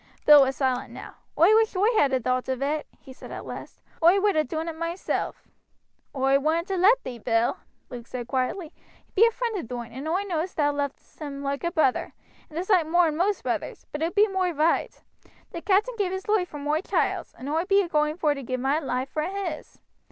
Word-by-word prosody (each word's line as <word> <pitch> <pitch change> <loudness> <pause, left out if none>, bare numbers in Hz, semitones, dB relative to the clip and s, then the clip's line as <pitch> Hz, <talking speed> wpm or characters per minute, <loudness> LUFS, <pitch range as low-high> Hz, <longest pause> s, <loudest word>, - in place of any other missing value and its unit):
Bill 295 -1 +9
was 265 0 +2
silent 260 -2 -1
now. - - -10 0.2
"Oi 350 +7 +6
wish 445 -1 +3
oi 380 +3 +2
had 285 -9 +4
a 260 - +2
thowt 255 +2 -1
of 260 0 -1
it," 295 +2 -1
he 265 - -13
said - - -12
at - - -7
last; - - -9 0.2
"oi 345 +4 +6
would 410 -1 +2
ha' 310 -2 +1
doon 320 +4 -3
it 330 - -4
moiself." 335 +3 -3 0.7
"Oi 270 +1 +3
wouldn't 325 +5 0
ha' 380 -2 -1
let 470 +6 +5
thee, 245 -2 -7
Bill," 230 - +1 0.3
Luke 240 -1 -8
said 245 -2 -6
quietly. 285 +7 -2 0.3
"He - - -36
be 450 +4 +6
a - - 0
friend 470 -1 -3
of 235 - -7
thine, 240 -1 -6
and 265 +6 -7
oi 360 +5 0
know 345 -6 -1
thou 295 -5 0
lovest 285 -1 -5
him 285 -2 -6
loike 280 0 -3
a 340 - 0
brother, 310 -8 +1 0.3
and 310 - -9
a 345 - 0
soight 370 -6 +3
mor'n 330 -2 +3
most 385 +5 0
brothers; - - -3
but 295 - -5
it 335 +4 -1
be 420 +1 +5
moi 380 -2 0
roight. 320 0 0 0.5
The 340 - -6
captain 410 +7 +2
gave 380 -3 +1
his 380 0 -4
loife 415 -4 +2
vor 295 - -8
moi 295 +2 0
child's, - - -1
and 260 - -8
oi 320 +4 0
bee 395 +1 +4
a - - -5
going 300 -1 0
vor 305 -4 +2
to 275 - -7
give 255 0 -3
mine 265 -1 0
for 305 +3 -3
his. 360 -2 -5
315 Hz, 225 wpm, -25 LUFS, 275-370 Hz, 0.7 s, Bill